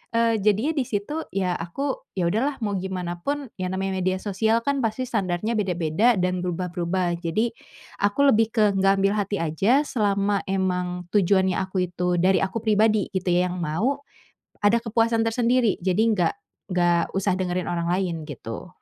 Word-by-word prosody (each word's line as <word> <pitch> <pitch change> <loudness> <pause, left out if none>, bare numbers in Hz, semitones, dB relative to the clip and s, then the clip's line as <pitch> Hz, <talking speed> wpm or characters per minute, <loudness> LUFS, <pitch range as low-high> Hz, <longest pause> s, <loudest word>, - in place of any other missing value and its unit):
Eee, 230 -1 +3
jadinya 215 +8 +2
di 275 -6 -1
situ, 220 +8 -3 0.2
ya, 185 -2 +1
aku, 265 +12 -4
ya 170 -2 +1
udahlah 270 +7 0
mau 205 - 0
gimana 180 -2 -4
pun, 285 +4 -3
ya, 185 - -1
namanya 190 0 -2
media 185 0 +1
sosial, 220 +3 +1
kan, 280 +1 0
pasti 225 +1 -1
standarnya 205 -2 -1
beda-beda 195 +2 +2
dan 180 0 0
berubah-berubah, 175 0 -2
jadi, 180 +8 0 0.5
aku 205 +5 0
lebih 225 +1 +3
ke 210 -2 +4
enggak 195 0 +2
ambil 200 - +3
hati 205 0 -1
aja 195 - +2
selama 205 -6 0
memang 180 -2 -2
tujuannya 190 -2 +3
aku 185 -1 -2
itu 180 0 0
dari 185 +2 +3
aku 210 +3 -2
pribadi, 215 -1 +2
gitu, 190 -2 -3
yang 180 0 0
mau 190 - -1 0.6
ada 205 +3 +4
kepuasan 225 0 +1
tersendiri, 235 -1 +1
jadi 180 0 0
enggak 210 -6 +2 0.4
enggak 175 -2 +2
usah 195 0 +1
dengerin 180 -1 -1
orang 170 0 -2
lain, 175 -4 -1
gitu. 115 -5 -7
195 Hz, 165 wpm, -24 LUFS, 180-220 Hz, 0.6 s, ke